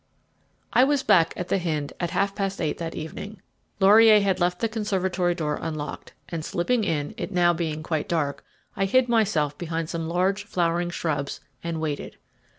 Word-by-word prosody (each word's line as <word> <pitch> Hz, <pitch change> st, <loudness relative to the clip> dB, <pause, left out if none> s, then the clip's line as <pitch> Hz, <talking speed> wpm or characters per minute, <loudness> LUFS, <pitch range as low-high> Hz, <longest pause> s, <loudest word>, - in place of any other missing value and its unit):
I 250 Hz, -, +6 dB
was 280 Hz, 0 st, +2 dB
back 165 Hz, -2 st, +4 dB
again -, -, -5 dB
at 180 Hz, -, -4 dB
The -, -, +2 dB
Hynde 155 Hz, -5 st, -2 dB
at 175 Hz, -, -1 dB
half 200 Hz, +4 st, 0 dB
past 195 Hz, -1 st, -2 dB
eight 155 Hz, -, -2 dB
that 165 Hz, -1 st, -4 dB
evening. 195 Hz, +6 st, -7 dB, 0.4 s
Laurier 215 Hz, +2 st, +7 dB
had 195 Hz, -2 st, +1 dB
left 180 Hz, 0 st, +1 dB
the 230 Hz, -, +1 dB
conservatory 190 Hz, -5 st, 0 dB
door 150 Hz, -4 st, -2 dB
unlocked, 155 Hz, -2 st, -5 dB
and, 165 Hz, -2 st, -4 dB
slipping 205 Hz, +8 st, 0 dB
in, 150 Hz, -6 st, -1 dB
it -, -, -4 dB, 0.2 s
being 160 Hz, -2 st, -2 dB
now -, -, -9 dB
quite 155 Hz, -1 st, -2 dB
dark, 150 Hz, -4 st, -1 dB, 0.3 s
I 195 Hz, -, +1 dB
hid 255 Hz, +6 st, +3 dB
myself 185 Hz, -11 st, +1 dB
behind 165 Hz, -1 st, -3 dB
some 165 Hz, -1 st, -3 dB
large 185 Hz, +4 st, 0 dB
flowering 175 Hz, 0 st, 0 dB
shrubs 150 Hz, -5 st, -2 dB, 0.2 s
and 165 Hz, -1 st, -3 dB
waited. 155 Hz, -2 st, -4 dB
175 Hz, 180 wpm, -25 LUFS, 160-200 Hz, 0.4 s, Laurier